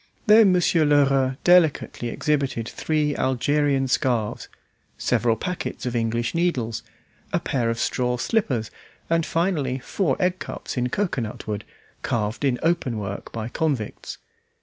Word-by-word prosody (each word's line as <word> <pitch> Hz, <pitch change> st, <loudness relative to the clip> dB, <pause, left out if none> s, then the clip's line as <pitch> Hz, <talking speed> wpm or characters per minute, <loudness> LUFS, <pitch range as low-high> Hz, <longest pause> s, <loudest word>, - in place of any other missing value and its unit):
Then 215 Hz, -2 st, +7 dB
Monsieur 175 Hz, -2 st, +3 dB
Lheureux 135 Hz, -3 st, +3 dB
delicately 170 Hz, -8 st, +3 dB
exhibited 135 Hz, -3 st, -1 dB
three 150 Hz, 0 st, -1 dB
Algerian 135 Hz, +1 st, +1 dB
scarves, 120 Hz, -4 st, 0 dB, 0.5 s
several 115 Hz, -2 st, +1 dB
packets 175 Hz, -1 st, -4 dB
of 125 Hz, -1 st, -2 dB
English 115 Hz, +1 st, 0 dB
needles, 150 Hz, -10 st, 0 dB, 0.5 s
a -, -, +1 dB
pair 120 Hz, -4 st, -1 dB
of 115 Hz, -, -1 dB
straw 125 Hz, +1 st, 0 dB
slippers, 125 Hz, -, 0 dB, 0.4 s
and 165 Hz, 0 st, +3 dB
finally, 155 Hz, -7 st, 0 dB
four 140 Hz, +4 st, -1 dB
eggcups 185 Hz, -1 st, -2 dB
in 125 Hz, -1 st, 0 dB
cocoanut 130 Hz, -, -2 dB
wood, 105 Hz, -1 st, -4 dB, 0.4 s
carved 110 Hz, +2 st, -2 dB
in 130 Hz, -3 st, +2 dB
open 165 Hz, -8 st, +1 dB
work 100 Hz, -1 st, -5 dB
by 110 Hz, -1 st, -4 dB
convicts. 130 Hz, -4 st, -3 dB
135 Hz, 125 wpm, -24 LUFS, 120-165 Hz, 0.5 s, Then